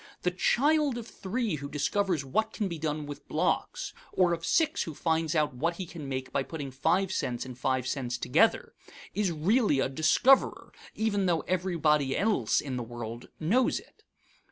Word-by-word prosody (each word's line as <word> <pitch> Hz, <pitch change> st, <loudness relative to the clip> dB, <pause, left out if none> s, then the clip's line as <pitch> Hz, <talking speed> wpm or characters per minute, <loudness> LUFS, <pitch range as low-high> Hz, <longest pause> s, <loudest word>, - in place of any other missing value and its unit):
The 180 Hz, -, +2 dB
child 285 Hz, -, +2 dB
of 235 Hz, -1 st, -6 dB
three 210 Hz, -4 st, -2 dB
who 140 Hz, 0 st, -6 dB
discovers 160 Hz, +2 st, 0 dB
what 220 Hz, +11 st, 0 dB
can 210 Hz, -, -1 dB
be 170 Hz, -3 st, -5 dB
done 150 Hz, -1 st, -2 dB
with 145 Hz, 0 st, -9 dB
blocks, -, -, -1 dB, 0.2 s
or 180 Hz, -2 st, +3 dB
of 165 Hz, -1 st, -4 dB
six 320 Hz, -2 st, +2 dB
who 160 Hz, -, -4 dB
finds 160 Hz, 0 st, 0 dB
out 150 Hz, -3 st, +2 dB
what 165 Hz, +7 st, -1 dB
he 185 Hz, -, -5 dB
can 160 Hz, -5 st, -8 dB
make 130 Hz, -1 st, -4 dB
by -, -, +1 dB
putting 140 Hz, -1 st, -6 dB
five 180 Hz, +8 st, +1 dB
cents 120 Hz, -9 st, -2 dB
and 130 Hz, -1 st, -8 dB
five 130 Hz, 0 st, 0 dB
cents 125 Hz, -2 st, -2 dB
together, 225 Hz, -, +2 dB, 0.4 s
is 200 Hz, -3 st, 0 dB
really 175 Hz, -, +2 dB
a 135 Hz, -, +1 dB
discoverer, 160 Hz, -, +3 dB, 0.2 s
even 205 Hz, -3 st, +1 dB
though 170 Hz, -2 st, +2 dB
everybody 155 Hz, -7 st, +1 dB
else 200 Hz, -, +2 dB
in 135 Hz, -3 st, -4 dB
the 120 Hz, -, -3 dB
world 120 Hz, 0 st, -7 dB
knows 225 Hz, +11 st, +2 dB
it. -, -, -21 dB
160 Hz, 180 wpm, -29 LUFS, 135-200 Hz, 0.4 s, or